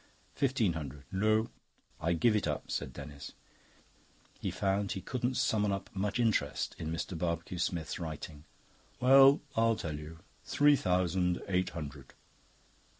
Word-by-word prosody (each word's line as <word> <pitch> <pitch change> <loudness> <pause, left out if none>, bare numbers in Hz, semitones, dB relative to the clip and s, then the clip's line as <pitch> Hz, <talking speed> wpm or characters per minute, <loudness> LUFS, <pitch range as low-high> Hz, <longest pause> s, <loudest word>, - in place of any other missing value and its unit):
"Fifteen 125 -9 +1
hundred." 75 -3 -6
"No." 110 +3 +2 0.5
"I 85 +1 +1
give 110 +7 +3
it 105 - +1
up," 75 - -3
said 70 -3 -2
Denis. 70 +2 -9 1.1
He - - -2
found 100 +1 0
he 95 - -4
couldn't 125 +3 -2
summon 105 -2 +2
up 100 0 -4
much 100 +4 -1
interest 115 -3 0
in 80 - -3
Mr. 85 +2 -3
Barbecue 85 +1 -2
Smith's 85 -3 -2
writing. 80 -2 -7 0.5
"Well, 135 +2 +7
I'll 115 0 +3
tell 75 -7 -4
you. 80 +2 -9 0.3
Three 145 0 +4
thousand 90 - +1
eight 95 -1 +1
hundred." 70 -4 -8
90 Hz, 140 wpm, -32 LUFS, 80-110 Hz, 1.1 s, Well